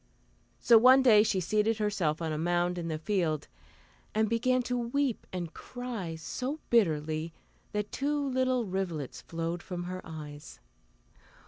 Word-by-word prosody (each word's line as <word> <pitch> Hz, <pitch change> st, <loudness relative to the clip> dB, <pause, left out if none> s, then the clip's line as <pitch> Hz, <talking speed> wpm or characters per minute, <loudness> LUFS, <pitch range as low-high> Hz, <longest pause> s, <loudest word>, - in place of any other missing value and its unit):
So 235 Hz, -2 st, +6 dB
one 260 Hz, +3 st, +7 dB
day 220 Hz, -5 st, +7 dB
she 210 Hz, -3 st, +1 dB
seated 215 Hz, +4 st, +1 dB
herself 185 Hz, -7 st, 0 dB
on 160 Hz, -1 st, -1 dB
a -, -, -2 dB
mound 175 Hz, +1 st, +1 dB
in 170 Hz, -, -4 dB
the 160 Hz, -1 st, -2 dB
field, 160 Hz, -3 st, -1 dB, 0.7 s
and 220 Hz, 0 st, +3 dB
began 250 Hz, +3 st, +1 dB
to 250 Hz, +1 st, -2 dB
weep 245 Hz, +1 st, -1 dB
and 175 Hz, -3 st, -4 dB
cry 235 Hz, -10 st, -6 dB
so 255 Hz, -, -4 dB
bitterly 160 Hz, -6 st, +1 dB, 0.4 s
that 210 Hz, 0 st, -3 dB
two 290 Hz, +2 st, -1 dB
little 255 Hz, -2 st, +1 dB
rivulets 180 Hz, -7 st, -3 dB
flowed 165 Hz, +1 st, -4 dB
from 175 Hz, -1 st, -5 dB
her 185 Hz, +1 st, -5 dB
eyes. 150 Hz, -2 st, -9 dB
195 Hz, 145 wpm, -30 LUFS, 165-240 Hz, 0.7 s, one